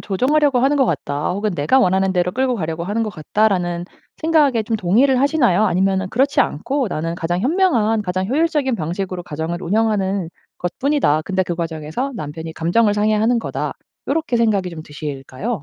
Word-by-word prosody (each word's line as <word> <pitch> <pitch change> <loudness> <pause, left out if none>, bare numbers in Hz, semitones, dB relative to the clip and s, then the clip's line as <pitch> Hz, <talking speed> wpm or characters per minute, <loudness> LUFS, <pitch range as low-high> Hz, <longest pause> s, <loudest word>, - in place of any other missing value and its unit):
조정하려고 270 +7 +2
하는 275 +3 +3
것 270 - +4
같다.' 145 +3 -2
혹은 205 +3 -1
'내가 170 - +2
원하는 190 -4 +2
대로 180 0 +1
끌고 255 +1 0
가려고 165 -3 -3
하는 210 +4 -1
것 215 - -2
같다.'라는 175 0 0 0.3
생각에 300 -8 +3
좀 220 +1 -1
동의를 240 +8 +3
하시나요? 255 - +3
아니면은 190 +1 +1
'그렇지 275 +6 +2
않고 265 - 0
나는 165 -1 -3
가장 170 +1 -2
현명한 240 - +2
가장 185 -1 -2
효율적인 290 - +1
방식으로 180 +1 -4
가정을 160 +3 -4
운영하는 200 -2 0 0.3
것뿐이다. 180 - +1
근데 190 -1 0
그 175 -1 -3
과정에서 165 - -3
남편이 160 -3 -6
감정을 205 +6 +2
상해하는 215 +3 +2
거다.' - - -3 0.3
요렇게 310 -4 0
생각이 205 -5 +1
좀 165 -2 -8
드실까요? 145 - -5
200 Hz, 420 characters per minute, -19 LUFS, 175-250 Hz, 0.3 s, 것